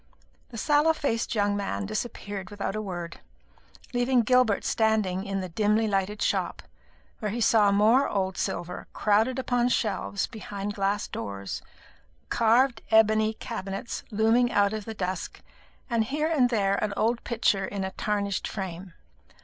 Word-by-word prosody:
The 235 - -9
sallow 295 +6 +3
faced 235 -7 -1
young 205 -1 +2
man 100 - -2
disappeared 205 - -5
without 205 -1 -4
a 215 - -2
word, 175 -4 -6 0.7
leaving 245 +1 +3
Gilbert 250 -3 +3
standing 215 -4 +1
in 195 -1 -2
the 185 - -5
dimly 210 +4 +2
lighted 200 +1 -1
shop, - - -1 0.6
where 215 - -2
he 230 +4 -3
saw 215 -3 +4
more 220 +7 +4
old 190 -2 -1
silver 175 +1 -4
crowded 220 +5 +2
upon 245 -1 +1
shelves 200 -3 -1
behind 205 -2 -6
glass 200 +1 -1
doors, 100 -1 -5 0.7
carved 235 +1 +3
ebony 220 0 +4
cabinets 200 +1 -5
looming 225 +3 +3
out 205 -1 +3
of 215 -2 -4
the 225 - -6
dusk, 185 -2 -4 0.4
and 230 -3 +1
here 300 +6 -1
and 260 -6 +3
there 200 -4 +1
an 210 -1 -1
old 235 +2 +1
picture 215 -4 +1
in 200 0 -4
a 190 - -3
tarnished 200 0 -2
frame. 185 -3 -6
210 Hz, 150 wpm, -27 LUFS, 195-235 Hz, 0.7 s, saw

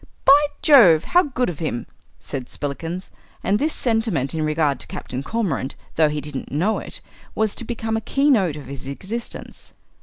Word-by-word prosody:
"By 290 +2 +7 0.2
Jove, 195 - +7
how 355 - +4
good 255 -6 -1
of 170 -5 -5
him!" 135 -7 -3 0.3
said 130 -3 -6
Spillikins; 165 +6 -5 0.3
and 200 +2 +2
this 310 +2 +1
sentiment 225 - 0
in 160 - -2
regard 155 -3 +1
to - - -7
Captain 130 +1 -5
Cormorant, 185 - -2 0.2
though 155 -1 +4
he 150 0 -3
didn't 145 -2 -6
know 180 +10 +1
it, - - -7 0.3
was 220 -2 +1
to - - -2
become 225 -1 -3
a 220 - -1
keynote 225 - +2
of 150 - -8
his 135 0 -8
existence. 200 +12 -6
180 Hz, 175 wpm, -22 LUFS, 145-230 Hz, 0.3 s, By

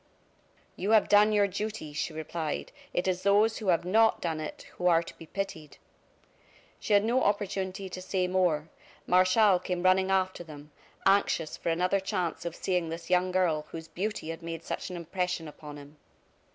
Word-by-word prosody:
"You 195 - -3
have - - +1
done 210 +1 +6
your 205 -1 +4
duty," 200 -5 -5
she 150 - -2
replied; 160 0 -4 0.2
"it 175 - -1
is 185 -1 0
those 205 +3 +3
who 215 - -6
have 175 -2 +2
not 220 +4 +4
done 165 -2 -2
it, 155 - -6 0.2
who 180 - +1
are 170 -1 +4
to - - -11
be 165 - -12
pitied!" 165 -5 -5 1.0
She 215 - -1
had 205 0 +5
no 240 +4 +2
opportunity 195 -2 -1
to 185 0 -7
say 185 0 -1
more. 175 -4 +1 0.4
Martial 185 +2 +4
came 180 -1 -3
running 185 +1 +4
after 185 -2 0
them, 150 -2 -12 0.3
anxious 195 -5 +2
for - - -3
another 180 +4 +2
chance 185 -4 -3
of 170 -1 -4
seeing 180 -3 -1
this 165 +2 -7
young 180 0 +3
girl 170 -5 +1
whose 160 0 -8
beauty 195 -2 -4
had 165 +1 -5
made 165 -1 -6
such - - -4
an 180 - -6
impression 175 0 -3
upon 150 0 -10
him. 145 +1 -13
180 Hz, 180 wpm, -29 LUFS, 165-195 Hz, 1.0 s, done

